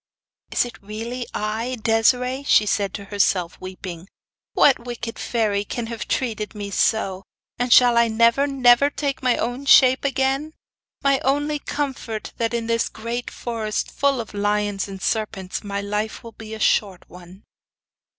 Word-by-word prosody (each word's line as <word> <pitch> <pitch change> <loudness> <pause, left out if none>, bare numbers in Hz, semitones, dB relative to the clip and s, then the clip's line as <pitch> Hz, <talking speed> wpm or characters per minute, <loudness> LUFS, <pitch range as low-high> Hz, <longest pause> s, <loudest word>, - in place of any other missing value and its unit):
'Is - - +1
it 240 - -10
really, 230 +4 -5
I, 225 +4 -3
Desiree?' 245 +4 +2
she 245 -6 +4
said 200 -1 0
to 200 - -6
herself, 195 -3 0
weeping. 185 -1 -8 0.5
'What 270 -4 +4
wicked 235 -1 -6
fairy 210 -4 0
can 230 +3 -4
have 225 - -6
treated 220 -4 -2
me 205 -1 -5
so; 195 -2 +1 0.4
and 245 0 -1
shall 245 -1 +7
I 235 - +4
never, 230 +5 +3
never 265 0 +4
take 285 -2 -3
my 250 -2 +2
own 245 +4 -3
shape 260 -1 +6
again? 275 +2 0 0.5
My 275 -1 +3
only 290 +2 0
comfort 265 -7 -4
that, 230 -1 0
in 230 -1 -2
this 230 0 0
great 235 +2 -5
forest, 225 -3 -3
full 280 -2 +1
of 225 -2 -6
lions 205 -1 0
and 195 -1 -8
serpents, 200 -3 -2
my 200 -1 -3
life 210 +2 -3
will 230 - -9
be 220 0 -9
a - - -9
short 200 -4 +1
one. 180 +2 -14
230 Hz, 160 wpm, -22 LUFS, 205-250 Hz, 0.5 s, shall